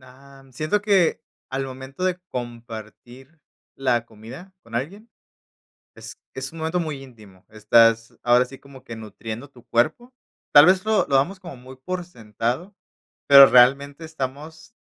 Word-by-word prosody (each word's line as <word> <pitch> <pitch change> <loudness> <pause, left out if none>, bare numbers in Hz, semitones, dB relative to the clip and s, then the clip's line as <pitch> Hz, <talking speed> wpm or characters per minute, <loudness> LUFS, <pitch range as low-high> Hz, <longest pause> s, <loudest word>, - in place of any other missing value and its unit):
Am, 135 +1 -18
siento 155 +10 -1
que 195 -5 +2 0.3
al 135 +1 -3
momento 135 +5 -7
de 180 -1 0
compartir 120 +4 -9 0.4
la 125 -3 0
comida 120 - -13
con 115 - -15
alguien, 195 - -5 0.9
es - - -11
es 130 +1 -6
un 165 - -11
momento 160 +3 -1
muy 150 -5 -5
íntimo. 105 -7 -17
Estás, 115 +1 +3
ahora 125 +1 +4
sí, 135 +1 -13
como 140 -1 -16
que 115 - -9
nutriendo 110 +3 -8
tu 125 -3 -20
cuerpo, 180 - -1 0.4
tal 145 +1 +9
vez, 185 +1 +3
lo 220 -1 +2
lo 140 - 0
damos 165 +9 +1
como 175 -6 -10
muy 130 +1 -13
por 180 +7 -6
sentado, 120 - -5 0.5
pero 140 -1 +10
realmente, 140 +5 +3
estamos 155 - -7
135 Hz, 150 wpm, -22 LUFS, 120-160 Hz, 0.9 s, pero